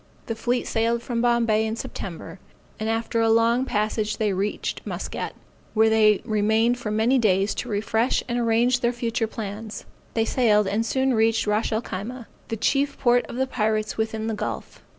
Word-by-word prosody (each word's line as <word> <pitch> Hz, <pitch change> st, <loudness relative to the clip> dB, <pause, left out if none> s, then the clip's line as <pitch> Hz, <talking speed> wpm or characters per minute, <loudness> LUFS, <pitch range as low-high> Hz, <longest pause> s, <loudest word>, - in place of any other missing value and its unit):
The 225 Hz, -, -2 dB
fleet 240 Hz, +2 st, -1 dB
sailed 230 Hz, +1 st, 0 dB
from 235 Hz, -2 st, -2 dB
Bombay 235 Hz, -3 st, +3 dB
in 220 Hz, 0 st, -2 dB
September, 180 Hz, -5 st, -7 dB, 0.4 s
and 215 Hz, +1 st, -2 dB
after 225 Hz, +1 st, 0 dB
a 225 Hz, -, +3 dB
long 230 Hz, +3 st, +3 dB
passage 215 Hz, -1 st, -1 dB
they 210 Hz, -3 st, +1 dB
reached 200 Hz, +3 st, -2 dB
Muscat, -, -, -5 dB, 0.4 s
where 220 Hz, 0 st, +4 dB
it 215 Hz, -2 st, +4 dB
remained 220 Hz, +3 st, +2 dB
for 230 Hz, -, -4 dB
many 225 Hz, +5 st, +2 dB
days 200 Hz, -2 st, +2 dB
to 245 Hz, -, -5 dB
refresh 220 Hz, +3 st, 0 dB
and 240 Hz, 0 st, -1 dB
arrange 235 Hz, +2 st, +2 dB
their 240 Hz, 0 st, +1 dB
future 230 Hz, -1 st, -1 dB
plans; 215 Hz, -1 st, -6 dB, 0.3 s
they 225 Hz, -1 st, +2 dB
sailed 215 Hz, -4 st, +3 dB
and 205 Hz, +4 st, 0 dB
soon 265 Hz, +2 st, +1 dB
reached 225 Hz, 0 st, +2 dB
Ras 210 Hz, +2 st, 0 dB
el 220 Hz, +2 st, 0 dB
Khyma, 230 Hz, +6 st, -6 dB, 0.2 s
the 225 Hz, -, -3 dB
chief 275 Hz, +5 st, +1 dB
port 245 Hz, -1 st, +3 dB
of -, -, -8 dB
the 260 Hz, +1 st, +1 dB
pirates 215 Hz, -4 st, -1 dB
within 220 Hz, 0 st, -2 dB
the 225 Hz, -, -1 dB
gulf. 210 Hz, -, -5 dB
225 Hz, 180 wpm, -24 LUFS, 215-235 Hz, 0.4 s, where